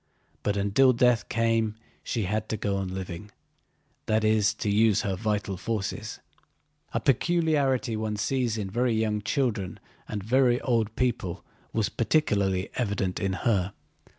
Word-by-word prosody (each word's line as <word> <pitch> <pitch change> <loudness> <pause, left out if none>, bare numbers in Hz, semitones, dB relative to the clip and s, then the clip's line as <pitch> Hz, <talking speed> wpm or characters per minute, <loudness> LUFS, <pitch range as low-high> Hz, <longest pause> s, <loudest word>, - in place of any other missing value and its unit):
But 100 -1 0
until 105 +7 +4
death 125 -1 +3
came 115 -2 +1 0.3
she 115 - -2
had 105 +3 -2
to 110 - -1
go 100 -1 -1
on 95 -1 -2
living, 95 +1 -6 0.8
that 110 0 +2
is, 110 -1 +3
to 110 - -4
use 105 0 +4
her 95 -1 -1
vital 100 -1 -2
forces. 105 +1 -3 0.7
A - - 0
peculiarity 140 -4 +2
one 110 -1 -2
sees 120 +1 0
in 105 -3 -3
very 120 +2 +1
young 110 -1 0
children 105 -5 -1 0.3
and 105 -2 -4
very 125 +2 +3
old 115 -4 0
people 105 -8 -1 0.3
was 110 -2 0
particularly 100 -8 +1
evident 100 -6 -1
in 95 -1 0
her. 100 -5 +2
110 Hz, 145 wpm, -27 LUFS, 100-120 Hz, 0.8 s, until